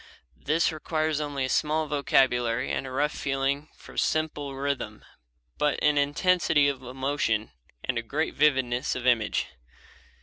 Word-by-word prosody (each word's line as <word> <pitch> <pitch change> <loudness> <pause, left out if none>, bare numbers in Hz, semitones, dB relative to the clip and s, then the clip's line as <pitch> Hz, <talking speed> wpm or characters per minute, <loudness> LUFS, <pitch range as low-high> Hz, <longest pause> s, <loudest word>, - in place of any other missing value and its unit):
This 160 +4 +2
requires 155 -1 -1
only 145 -3 -2
a - - -4
small 155 +3 +1
vocabulary 125 -5 +2
and 135 - -2
a - - -7
rough 145 +3 +1
feeling 140 +2 -1
for - - -14
simple 150 -3 -1
rhythm, 140 0 -3 0.5
but 150 -1 +2
an 150 -1 +4
intensity 150 0 +3
of 140 -2 -2
emotion 130 - -1 0.3
and 125 -3 -1
a - - -3
great 145 +8 -2
vividness 130 -3 +2
of 130 -1 -5
image. 120 -4 +2
140 Hz, 140 wpm, -27 LUFS, 130-150 Hz, 0.5 s, an